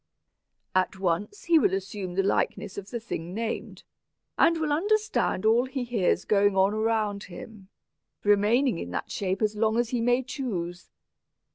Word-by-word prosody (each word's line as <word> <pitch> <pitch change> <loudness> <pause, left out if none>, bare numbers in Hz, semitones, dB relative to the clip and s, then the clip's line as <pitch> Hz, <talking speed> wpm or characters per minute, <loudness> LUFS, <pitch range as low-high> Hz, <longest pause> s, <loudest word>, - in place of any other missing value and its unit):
"At 185 +1 +1
once 190 - -2
he 335 -2 +5
will 190 -9 +2
assume 190 -1 -5
the 195 - +2
likeness 195 -1 -1
of 200 0 -7
the 240 - -4
thing 180 -5 -6
named, 225 0 -4 0.5
and 335 - +4
will 310 -2 -1
understand 415 - +1
all 230 +3 +4
he 260 0 -4
hears 235 -6 0
going 205 -1 +3
on 195 +2 +4
around 215 -2 0
him, 195 +2 -11 0.5
remaining 210 +3 +3
in 85 - -5
that 90 - -4
shape 195 +1 -2
as 215 0 +1
long 220 +1 +1
as 240 -1 +1
he 245 -2 -1
may 245 +2 +2
choose. 185 - -5
210 Hz, 160 wpm, -27 LUFS, 190-245 Hz, 0.5 s, he